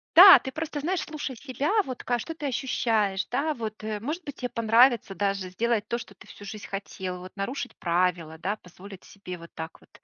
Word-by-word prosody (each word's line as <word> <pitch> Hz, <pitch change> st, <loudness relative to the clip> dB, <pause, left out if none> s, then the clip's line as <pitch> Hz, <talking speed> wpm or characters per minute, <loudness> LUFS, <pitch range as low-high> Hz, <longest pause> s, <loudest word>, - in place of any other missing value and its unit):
Да, 375 Hz, +2 st, +12 dB
ты 265 Hz, -, -6 dB
просто 310 Hz, 0 st, -4 dB
знаешь, 350 Hz, +4 st, -1 dB
слушай 295 Hz, -4 st, -5 dB
себя, 270 Hz, -, -2 dB
вот 255 Hz, -7 st, -6 dB
ка 245 Hz, -1 st, +1 dB
что 325 Hz, -, -5 dB
ты 305 Hz, -3 st, -4 dB
ощущаешь, 220 Hz, -6 st, 0 dB
да, 295 Hz, +5 st, 0 dB
вот, 215 Hz, -3 st, -6 dB
э. 215 Hz, -1 st, -3 dB
Может 310 Hz, -, -4 dB
быть, 285 Hz, -2 st, -8 dB
те 250 Hz, -1 st, -3 dB
понравится 230 Hz, -1 st, +4 dB
даже 195 Hz, -2 st, -1 dB
сделать 225 Hz, +2 st, 0 dB
то, 235 Hz, -, -1 dB
что 240 Hz, -, -10 dB
ты -, -, -16 dB
всю 205 Hz, -, -12 dB
жизнь 215 Hz, 0 st, -7 dB
хотел, 190 Hz, -2 st, -5 dB
вот 185 Hz, +1 st, -10 dB
нарушить 245 Hz, +6 st, -4 dB
правила, 170 Hz, -2 st, 0 dB
да, 195 Hz, +5 st, -1 dB
позволить 185 Hz, +1 st, -13 dB
себе 180 Hz, -3 st, -9 dB
вот 170 Hz, 0 st, -13 dB
так 160 Hz, 0 st, -7 dB
вот, -, -, -23 dB
220 Hz, 210 wpm, -27 LUFS, 195-265 Hz, -, Да